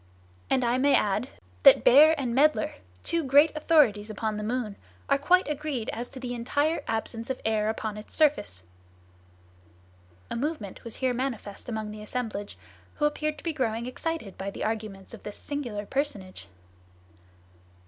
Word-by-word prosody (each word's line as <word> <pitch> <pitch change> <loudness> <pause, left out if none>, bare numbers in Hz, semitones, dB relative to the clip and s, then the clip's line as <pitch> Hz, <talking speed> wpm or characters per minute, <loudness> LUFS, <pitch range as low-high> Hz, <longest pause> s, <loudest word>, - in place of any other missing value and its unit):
And 260 -1 +2
I 240 +1 +2
may 280 +1 +4
add 210 +3 +1 0.3
that - - +8
Baeer 305 +5 +8
and 250 -4 -2
Maedler, 280 -3 +3
the 90 0 -23
two 335 -1 0
great 290 +3 +5
authorities 270 -10 +3
upon 215 0 -2
the 210 - -4
moon, 225 -2 -2 0.3
are 275 0 +3
quite 365 +6 +4
agreed 295 -5 -3
as 240 +2 -5
to 265 - -10
the 250 -1 -4
entire 285 +7 0
absence 225 +1 -3
of 260 - -2
air 215 -1 +1
on 215 -1 -3
its 210 - -10
surface." 105 - +1 1.7
A - - -2
movement 235 - -4
was 230 - -7
here 260 -1 0
manifest 245 -5 -4
among 220 -2 -3
the 210 0 -8
assemblage, 210 - -4 0.4
who 295 - 0
appeared 305 +1 -1
to - - -13
be 330 - -1
growing 235 -5 -1
excited 255 - -4
by 195 +1 -3
the - - -6
arguments 215 -3 -4
of 230 - -10
this 210 - -8
singular 240 -8 -4
personage. 205 - -3
240 Hz, 165 wpm, -27 LUFS, 210-285 Hz, 1.7 s, that